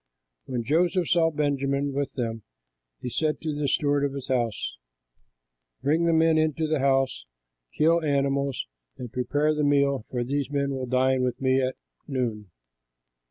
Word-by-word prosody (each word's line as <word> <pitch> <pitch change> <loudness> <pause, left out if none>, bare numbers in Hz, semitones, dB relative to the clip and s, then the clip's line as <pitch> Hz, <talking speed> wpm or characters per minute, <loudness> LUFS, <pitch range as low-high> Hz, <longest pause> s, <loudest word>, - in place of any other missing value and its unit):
When 125 -2 -3
Joseph 170 - +2
saw 165 -2 +4
Benjamin 140 -2 0
with 140 0 -2
them, 115 -3 -3 0.6
he - - -5
said 155 +3 0
to 155 -2 -2
the 145 0 -1
steward 145 +1 +2
of 140 -1 0
his 140 -2 -7
house, 120 - -1 1.1
"Bring 160 +4 +2
the 170 - +3
men 160 -1 +4
into 155 0 +1
the 155 -1 0
house, 135 - +1 0.4
kill 165 +2 +3
animals, 140 -2 0 0.3
and 125 -2 -8
prepare 145 +4 +1
the 150 0 -1
meal, 140 -4 +2
for 125 -1 -2
these 140 +2 -2
men 140 -1 0
will 130 -1 -3
dine 130 +1 +2
with 125 -1 -1
me 130 0 +2
at 130 0 -1 0.3
noon." 115 -7 -3
140 Hz, 160 wpm, -26 LUFS, 130-150 Hz, 1.1 s, saw